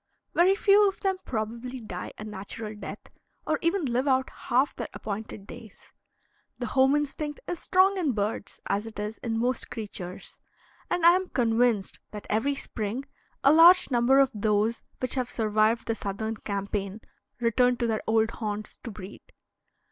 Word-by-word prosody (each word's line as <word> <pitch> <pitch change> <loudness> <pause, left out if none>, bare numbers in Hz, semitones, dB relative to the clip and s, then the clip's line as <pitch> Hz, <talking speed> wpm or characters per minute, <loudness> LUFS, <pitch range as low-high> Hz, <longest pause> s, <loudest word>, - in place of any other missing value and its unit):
Very 370 +3 +5
few 405 0 +5
of 390 - -3
them 385 -1 +1
probably 235 +3 -4
die 180 -6 -6
a - - -7
natural 210 +1 -6
death, 210 - -9 0.3
or 305 -1 0
even 340 0 +1
live 255 +2 0
out 260 -1 +2 0.2
half 260 +4 +2
their 235 - -4
appointed 205 -1 -6
days. 220 -1 -13 0.6
The 245 - -3
home 265 +2 +5
instinct 295 0 -2
is 350 - -3
strong 380 +1 +3
in 305 -7 +1
birds 210 0 -3
as 205 +3 -1
it 225 - -10
is 210 +1 -4
in 225 -2 -2
most 245 +2 0
creatures; 195 -5 -7 0.5
and 355 -1 +1
I 340 - +10
am 370 0 -1
convinced 230 -4 +1
that 210 -1 -8
every 255 +7 +1
spring 230 0 -4 0.4
a 275 - +7
large 335 0 +7
number 245 +2 +4
of 275 -1 +5
those 215 +2 +1 0.2
which 255 - 0
have 250 -2 -1
survived 220 0 +1
the 225 - 0
Southern 220 +1 -4
campaign 200 0 -4 0.4
return 245 +1 +3
to 240 - 0
their 220 -2 0
old 225 0 +3
haunts 215 -1 -5
to 240 - -8
breed. 200 -2 -9
230 Hz, 165 wpm, -27 LUFS, 215-275 Hz, 0.6 s, I